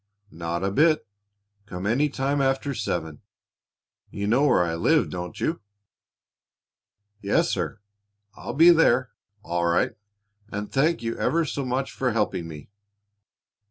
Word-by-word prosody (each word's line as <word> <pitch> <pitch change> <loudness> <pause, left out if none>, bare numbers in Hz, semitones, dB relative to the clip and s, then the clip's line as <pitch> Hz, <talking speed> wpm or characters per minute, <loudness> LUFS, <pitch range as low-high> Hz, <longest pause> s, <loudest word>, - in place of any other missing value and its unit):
"Not 85 +2 -4
a 100 - 0
bit. 155 +6 +3 0.6
Come 90 0 -6
any 135 +8 +2
time 140 +1 -1
after 135 +1 0
seven. 80 - -3 0.9
You 100 - -4
know 125 +7 +3
where 90 - +4
I 85 -1 -2
live, 85 - +2
don't 90 -1 -6
you?" 165 - -1 1.6
"Yes, 100 - +1
sir. - - -3 0.6
I'll - - -7
be 165 +4 +8
there, 130 -8 +3 0.3
all 85 0 -1
right; 85 - +2 0.6
and 105 0 -5
thank 150 0 +1
you 115 0 -2
ever 165 0 +1
so 140 -1 -3
much 130 +1 -2
for 125 -3 -1
helping 105 -6 -1
me." 75 +2 -11
115 Hz, 135 wpm, -25 LUFS, 90-140 Hz, 1.6 s, be